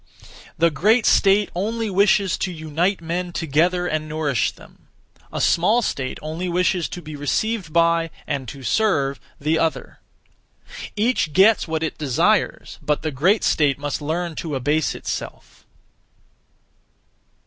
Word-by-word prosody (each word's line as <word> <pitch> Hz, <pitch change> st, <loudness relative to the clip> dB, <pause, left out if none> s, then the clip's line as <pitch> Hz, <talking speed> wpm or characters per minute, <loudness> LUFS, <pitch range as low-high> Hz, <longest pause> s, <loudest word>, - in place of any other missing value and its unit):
The 170 Hz, +1 st, +3 dB
great 210 Hz, -, +3 dB
state 200 Hz, +1 st, +4 dB
only 220 Hz, +5 st, -2 dB
wishes 200 Hz, -1 st, +3 dB
to 185 Hz, -, -1 dB
unite 165 Hz, +4 st, -1 dB
men 175 Hz, +2 st, -3 dB
together 170 Hz, +3 st, +1 dB
and 155 Hz, -2 st, -2 dB
nourish 150 Hz, -6 st, 0 dB
them; -, -, -19 dB, 0.4 s
a -, -, -4 dB
small 215 Hz, +8 st, +3 dB
state 130 Hz, -9 st, -3 dB
only 160 Hz, +4 st, -4 dB
wishes 180 Hz, 0 st, +1 dB
to 175 Hz, -, -8 dB
be 155 Hz, 0 st, -8 dB
received 180 Hz, +6 st, -1 dB
by, 170 Hz, 0 st, +2 dB, 0.2 s
and 140 Hz, -3 st, -3 dB
to 135 Hz, +4 st, -9 dB
serve, 140 Hz, -, +1 dB, 0.2 s
the 155 Hz, +3 st, +1 dB
other. 165 Hz, -1 st, -2 dB, 1.0 s
Each 215 Hz, -7 st, 0 dB
gets 200 Hz, +5 st, +5 dB
what 160 Hz, 0 st, -2 dB
it 160 Hz, -, -4 dB
desires, 140 Hz, -5 st, 0 dB
but 150 Hz, 0 st, -1 dB
the 155 Hz, -, -1 dB
great 180 Hz, -, +2 dB
state 145 Hz, -3 st, +2 dB
must 145 Hz, 0 st, -4 dB
learn 165 Hz, +3 st, -2 dB
to 155 Hz, -4 st, -4 dB
abase 145 Hz, +4 st, 0 dB
itself. -, -, -7 dB
165 Hz, 135 wpm, -22 LUFS, 150-190 Hz, 1.0 s, gets